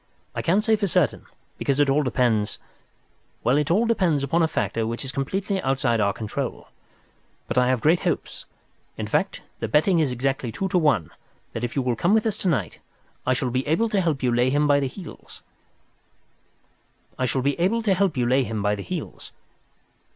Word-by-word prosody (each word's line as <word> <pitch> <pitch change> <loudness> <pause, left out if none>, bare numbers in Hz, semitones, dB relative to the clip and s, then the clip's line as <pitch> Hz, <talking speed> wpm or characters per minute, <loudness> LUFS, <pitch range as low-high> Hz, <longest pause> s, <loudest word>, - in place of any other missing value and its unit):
I - - -3
can't 195 +5 +2
say 225 -1 +3
for 205 -2 -1
certain, 170 - +1 0.3
because 140 0 0
it 145 - +4
all 140 +2 +3
depends—well, 120 0 -2
it 150 0 +1
all 205 +8 +3
depends 180 -11 +1
upon 165 +5 +1
a 165 - +4
factor 115 -8 -1
which 115 +4 -4
is 135 - -4
completely 190 +8 -2
outside 130 -5 +1
our 100 -1 +3
control. 110 0 -5 0.8
But 120 +1 +1
I 125 - +3
have 130 -2 +1
great 165 +6 +4
hopes—in - - -6
fact, - - -1 0.2
the 115 - -2
betting 155 - +3
is 150 -5 +1
exactly 130 -1 -1
two 190 - -2
to 180 - +2
one—that 115 - -2
if 120 - -3
you 135 - +1
will 125 -1 0
come 175 - +2
with 220 - +2
us 220 - -1
to - - -2
night 115 - -1 0.5
I 130 - +4
shall 125 0 -1
be 130 +3 -1
able 195 +10 +2
to 205 -3 +1
help 155 -6 -1
you 125 - +2
to 120 - +1
lay 125 +1 +3
him 145 +2 +2
by 145 -1 +4
the 140 - 0
heels." 175 +5 -11
140 Hz, 165 wpm, -24 LUFS, 125-170 Hz, 0.8 s, it